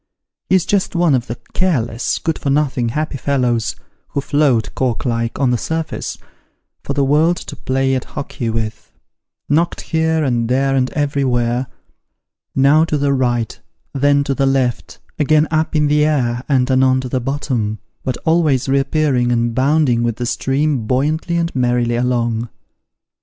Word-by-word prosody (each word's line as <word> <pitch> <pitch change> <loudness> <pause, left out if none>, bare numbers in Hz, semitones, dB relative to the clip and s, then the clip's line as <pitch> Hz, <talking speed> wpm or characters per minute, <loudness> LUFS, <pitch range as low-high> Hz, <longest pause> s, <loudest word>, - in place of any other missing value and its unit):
He 190 - +4
is 185 - +2
just 200 -2 0
one 170 -3 +3
of 125 -2 0
the 115 - -5 0.2
careless, 125 -11 0
good 160 -1 -2
for 140 - -2
nothing, 135 -4 +1
happy 150 +3 -2
fellows, 125 -5 0 0.3
who 140 - -3
float, 140 -6 +1
cork 125 -2 -1
like, 115 -1 -1
on 130 -2 +2
the 120 - 0
surface, 160 -1 -3 0.7
for 140 - -3
the 140 0 +1
world 155 +5 +3
to 145 - -8
play 135 0 0
at 130 - -1
hockey 120 -4 -5
with: 110 -1 -4 0.6
knocked 165 +4 +1
here, 160 -1 0
and 120 -4 0
there, 135 +2 +2
and 130 -1 +1
everywhere: 130 -4 0 0.9
now 140 +4 +5
to 155 -2 0
the 140 -1 +1
right, 120 -4 -1 0.3
then 140 +1 +3
to 140 - -1
the 135 0 +1
left, 130 -3 -1 0.2
again 155 +1 +3
up 160 0 0
in 150 -1 +3
the 150 +1 +3
air, 125 -5 0
and 130 -2 +2
anon 130 0 +3
to 130 - -5
the 130 +1 -1
bottom, 120 -5 -2 0.3
but 130 - -2
always 160 -6 +2
reappearing 135 -2 +1
and 120 -1 +1
bounding 135 -1 +2
with 120 -1 0
the 120 - -4
stream 135 -1 0
buoyantly 155 +7 0
and 170 -2 -1
merrily 120 -2 +1
along. 120 -2 0
135 Hz, 165 wpm, -18 LUFS, 120-150 Hz, 0.9 s, now